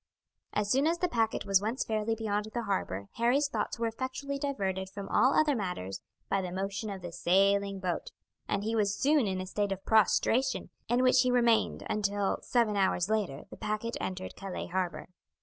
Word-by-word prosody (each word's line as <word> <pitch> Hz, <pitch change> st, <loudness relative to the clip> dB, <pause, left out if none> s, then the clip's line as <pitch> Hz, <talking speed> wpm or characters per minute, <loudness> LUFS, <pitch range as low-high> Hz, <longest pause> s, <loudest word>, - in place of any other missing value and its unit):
As 205 Hz, -1 st, 0 dB
soon 275 Hz, +4 st, +3 dB
as 335 Hz, +1 st, +2 dB
the 360 Hz, +1 st, +1 dB
packet 225 Hz, -9 st, 0 dB
was 195 Hz, -1 st, +4 dB
once 225 Hz, +5 st, -1 dB
fairly 220 Hz, 0 st, -1 dB
beyond 210 Hz, -1 st, -2 dB
the 240 Hz, -, -1 dB
harbour 100 Hz, -, -2 dB
Harry's 250 Hz, +5 st, +3 dB
thoughts 285 Hz, -, -2 dB
were 230 Hz, -, -1 dB
effectually 260 Hz, +4 st, -3 dB
diverted 190 Hz, -9 st, -2 dB
from 195 Hz, 0 st, -7 dB
all 260 Hz, +2 st, +4 dB
other 305 Hz, -2 st, +3 dB
matters 180 Hz, -, -4 dB, 0.3 s
by 195 Hz, -, +1 dB
the 180 Hz, -1 st, -4 dB
motion 195 Hz, +3 st, -3 dB
of 195 Hz, -2 st, -6 dB
the 175 Hz, -, -5 dB
sailing 195 Hz, +3 st, +2 dB
boat, 180 Hz, -2 st, -3 dB, 0.4 s
and 200 Hz, -, -1 dB
he 225 Hz, +2 st, -1 dB
was 205 Hz, -2 st, +1 dB
soon 285 Hz, -4 st, +3 dB
in 190 Hz, -1 st, -1 dB
a 185 Hz, -, -3 dB
state 205 Hz, +2 st, -1 dB
of 195 Hz, 0 st, -4 dB
prostration, 225 Hz, +4 st, +2 dB, 0.2 s
in 245 Hz, +1 st, +3 dB
which 255 Hz, 0 st, +5 dB
he 255 Hz, -, +2 dB
remained 235 Hz, -2 st, +2 dB
until, 205 Hz, -1 st, 0 dB
seven 230 Hz, -4 st, +1 dB
hours 190 Hz, -1 st, +1 dB
later, 195 Hz, -11 st, -1 dB
the -, -, -9 dB
packet 215 Hz, +2 st, -3 dB
entered 185 Hz, 0 st, -4 dB
Calais 195 Hz, -2 st, -5 dB
harbour. 180 Hz, -1 st, -2 dB
210 Hz, 190 wpm, -30 LUFS, 195-240 Hz, 0.4 s, which